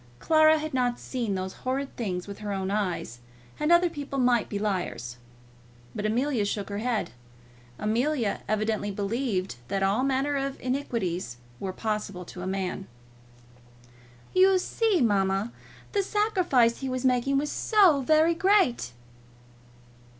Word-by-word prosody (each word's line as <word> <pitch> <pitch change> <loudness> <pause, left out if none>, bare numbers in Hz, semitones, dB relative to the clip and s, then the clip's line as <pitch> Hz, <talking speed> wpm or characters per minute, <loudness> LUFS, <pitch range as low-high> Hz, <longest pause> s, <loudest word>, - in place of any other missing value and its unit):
Clara 315 - +5
had 310 -1 -5
not 245 -2 +1
seen 235 -6 -3
those 185 0 -4
horrid 270 +2 -2
things 185 -6 -3
with 200 - -8
her 210 -1 -4
own 195 -1 -2
eyes, 185 - -2 0.4
and 300 +2 +1
other 345 +1 +6
people 285 -4 -5
might 245 -3 +2
be 205 - -3
liars. 175 - -3 0.8
But 210 - -2
Amelia 245 +1 +1
shook 205 0 -3
her 200 0 -3
head. 225 - -1 0.7
Amelia 235 +1 0
evidently 215 -1 0
believed 200 - -2
that 195 +5 -1
all 200 +5 +2
manner 275 +2 +1
of 275 0 -3
iniquities 225 - -2 0.2
were 190 - -3
possible 210 -3 -3
to 180 +1 -8
man. 190 0 -3 1.5
"You 375 +1 +5
see, 415 0 +1
mamma, 200 -1 +1 0.4
the 405 - +2
sacrifice 370 - +2
he 270 - -3
was 255 0 -2
making 255 +2 +2
was 290 +1 -1
so 380 -10 +4
very 315 +4 +4
great!" 350 - +2
240 Hz, 135 wpm, -27 LUFS, 200-285 Hz, 1.5 s, other